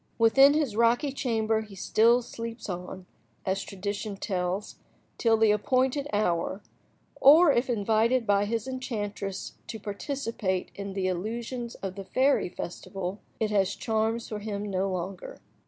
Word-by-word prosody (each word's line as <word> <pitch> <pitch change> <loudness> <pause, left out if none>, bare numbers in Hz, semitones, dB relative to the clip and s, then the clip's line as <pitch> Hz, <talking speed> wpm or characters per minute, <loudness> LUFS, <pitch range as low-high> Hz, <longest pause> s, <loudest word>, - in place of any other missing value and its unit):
Within 270 +5 +6
his 290 -9 0
rocky 235 +5 +3
chamber 225 -4 0
he 210 -2 -11
still 230 +5 +3
sleeps 230 0 -7
on, 180 +1 -6 0.4
as 190 +1 0
tradition 200 +1 -4
tells, 185 0 -2 0.4
till 225 -1 +4
the 220 -1 +5
appointed 260 +6 +1
hour; 190 -1 0 0.5
or 305 +4 +8
if 245 0 +1
invited 230 +2 +2
by 205 -1 +3
his 225 +2 -2
enchantress 210 -6 -4
to 220 - -5
participate 210 -3 -3
in 200 -1 -6
the 190 -1 -2
illusions 230 +6 -3
of 190 -1 -3
the 195 0 -8
fairy 265 -2 +2
festival, 185 +2 -5 0.2
it 215 -1 0
has 200 -1 +2
charms 225 +1 -1
for 215 - -5
him 205 -1 -4
no 190 +1 0
longer. 185 +1 -5
215 Hz, 140 wpm, -28 LUFS, 195-235 Hz, 0.5 s, or